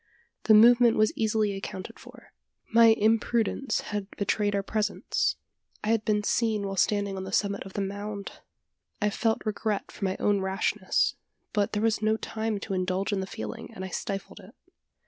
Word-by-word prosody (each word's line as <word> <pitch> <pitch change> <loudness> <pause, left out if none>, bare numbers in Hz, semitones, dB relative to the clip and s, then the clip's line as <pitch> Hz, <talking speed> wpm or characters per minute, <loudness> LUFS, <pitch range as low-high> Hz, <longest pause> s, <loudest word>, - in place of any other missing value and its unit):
The 220 - +7
movement 235 +1 +7
was 215 0 +3
easily 215 -2 +1
accounted 190 -1 -7
for. - - -15 0.4
My 230 0 +8
imprudence 225 +2 +2
had 205 -1 -4
betrayed 205 0 0
our 200 - 0
presence. 215 +1 -1 0.5
I 215 - -1
had 225 -1 +2
been 210 -1 +1
seen 220 -2 +1
while 195 0 -3
standing 200 +1 +1
on 190 - -4
the 190 - -7
summit 200 0 0
of 190 - -12
the 200 - -2
mound! 200 +1 -5 0.6
I 210 -2 +1
felt 225 +2 0
regret 215 -1 -2
for - - -9
my 190 0 -1
own 205 -1 +2
rashness; 190 +1 0 0.4
but 205 -2 0
there 210 0 0
was 225 -1 +1
no 220 0 +2
time 220 -1 -3
to 200 - -4
indulge 185 +2 -1
in 200 - 0
the 190 - -3
feeling, 110 - -7
and 190 - -5
I - - -6
stifled 195 +2 -5
it. 225 +8 -15
210 Hz, 180 wpm, -27 LUFS, 195-220 Hz, 0.6 s, My